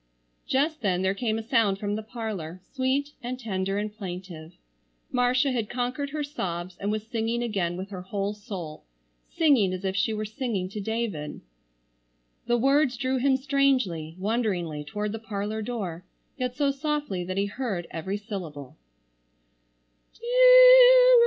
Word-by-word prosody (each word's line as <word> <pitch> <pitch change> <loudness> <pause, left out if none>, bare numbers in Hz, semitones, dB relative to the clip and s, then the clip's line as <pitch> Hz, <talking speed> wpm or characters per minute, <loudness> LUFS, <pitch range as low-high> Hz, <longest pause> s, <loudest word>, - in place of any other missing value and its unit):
Just 300 +4 +1
then 185 -3 +1
there 190 0 +2
came 220 +1 -1
a 225 - -4
sound 225 -5 +2
from 205 +1 -3
the 215 - -3
parlor, 215 -7 -6
sweet 270 +2 0
and 250 +1 -5
tender 195 -4 -2
and 210 0 -3
plaintive. 180 -5 -7 0.6
Marcia 250 +2 +2
had 230 -4 -2
conquered 250 +3 -2
her 300 +1 -3
sobs 180 -10 -4
and 200 - -2
was 215 0 -2
singing 230 +1 -1
again 185 -7 -1
with 190 +2 -6
her 185 -2 -6
whole 200 +2 -3
soul, 195 -8 -8 0.5
singing 275 - +3
as 185 +1 -5
if 190 0 -1
she 200 +3 +1
were 215 0 -2
singing 215 -4 -3
to 210 +2 -5
David. 210 -8 -3 1.1
The 240 - +3
words 270 +1 +3
drew 260 +1 0
him 265 +1 +3
strangely, 255 - +1
wonderingly 185 -7 -1
toward 210 +8 -3
the 225 - -5
parlor 215 0 -4
door, 200 -7 -4 0.3
yet 250 -2 -3
so 280 0 +2
softly 290 - -2
that 185 +1 -4
he 200 - +2
heard 205 -5 -3
every 190 +5 -3
syllable. 170 - -7
215 Hz, 150 wpm, -26 LUFS, 190-250 Hz, 1.1 s, singing